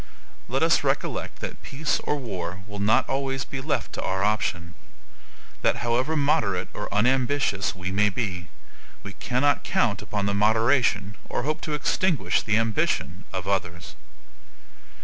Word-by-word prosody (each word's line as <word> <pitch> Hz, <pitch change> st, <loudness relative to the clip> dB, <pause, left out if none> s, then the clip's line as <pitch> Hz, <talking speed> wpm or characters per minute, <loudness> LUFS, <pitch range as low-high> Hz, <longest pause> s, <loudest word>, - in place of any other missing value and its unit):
Let -, -, 0 dB
us -, -, +4 dB
recollect -, -, -1 dB
that -, -, -6 dB
peace 150 Hz, +3 st, -1 dB
or 150 Hz, -, -1 dB
war 95 Hz, -7 st, -5 dB
will 105 Hz, -1 st, -8 dB
not 105 Hz, +3 st, +3 dB
always 135 Hz, -1 st, -1 dB
be 140 Hz, -, -5 dB
left 145 Hz, +2 st, -2 dB
to -, -, -4 dB
our 95 Hz, +1 st, -1 dB
option; 90 Hz, -5 st, 0 dB, 0.9 s
that -, -, +3 dB
however 125 Hz, +7 st, +1 dB
moderate 140 Hz, -, +1 dB
or -, -, -5 dB
unambitious 120 Hz, -3 st, +2 dB
we 90 Hz, 0 st, -4 dB
may 105 Hz, +2 st, +3 dB
be, 95 Hz, -5 st, -3 dB, 0.6 s
we 100 Hz, -, -7 dB
cannot 130 Hz, +6 st, +1 dB
count -, -, +1 dB
upon 105 Hz, -1 st, -2 dB
the 100 Hz, -, +1 dB
moderation, 110 Hz, 0 st, +2 dB
or -, -, -1 dB
hope 155 Hz, +2 st, -1 dB
to 150 Hz, -, -2 dB
extinguish 170 Hz, +2 st, +1 dB
the 105 Hz, 0 st, +2 dB
ambition 105 Hz, -5 st, 0 dB
of 95 Hz, -1 st, -4 dB
others. 85 Hz, -3 st, -2 dB
105 Hz, 150 wpm, -25 LUFS, 95-135 Hz, 0.9 s, us